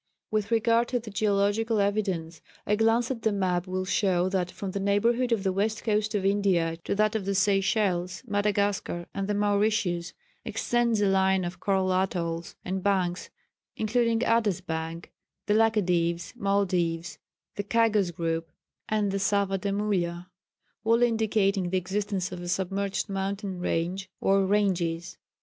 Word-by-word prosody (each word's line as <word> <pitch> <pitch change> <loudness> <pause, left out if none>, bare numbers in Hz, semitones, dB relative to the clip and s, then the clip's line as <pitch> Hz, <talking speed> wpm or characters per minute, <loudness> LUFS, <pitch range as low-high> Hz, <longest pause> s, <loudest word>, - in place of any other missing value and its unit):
"With 215 -2 0
regard 230 +1 +3
to 245 0 0
the 225 -2 -9
geographical 205 +2 +1
evidence, 190 -6 -1 0.2
a 210 - +2
glance 225 +3 +2
at 240 -3 -4
the 220 - +2
map 185 -3 0
will 185 0 -2
show 185 -2 +1
that 185 -2 -1
from 195 +1 -6
the 200 - -3
neighbourhood 230 +5 +2
of 220 -4 +1
the 190 - +1
West 215 +3 -1
Coast 215 0 0
of 195 -2 0
India 190 -5 +2
to - - -1
that 215 +1 +2
of 215 -4 -2
the 200 0 -1
Seychelles, 195 -1 +1
Madagascar, 205 -4 0
and 195 -1 -3
the 205 - 0
Mauritius, 205 -4 +1 0.3
extends 235 -3 0
a 205 - +3
line 190 -1 +2
of 175 +2 -6
coral 190 -2 +1
atolls 170 -3 -2
and 190 +1 -2
banks, 185 -3 0 0.5
including 230 +1 +1
Adas 220 -6 +1
bank, 165 0 -5 0.3
the 210 - +2
Laccadives, 180 -6 +1
Maldives, 180 -5 0 0.4
the 205 - -3
Chagos 215 -3 +2
group 165 -1 -2 0.4
and 210 -2 +1
the 195 - -1
Saya 200 -1 +1
de 200 +1 -2
Mulha, 180 -3 -1 0.5
all 230 +2 +3
indicating 210 -5 +1
the 190 - +1
existence 190 0 -2
of 180 -1 -6
a 175 - -6
submerged 195 +2 -1
mountain 195 -1 -3
range 180 +2 -2
or 195 0 +3
ranges. 180 -4 0
195 Hz, 155 wpm, -27 LUFS, 180-210 Hz, 0.5 s, regard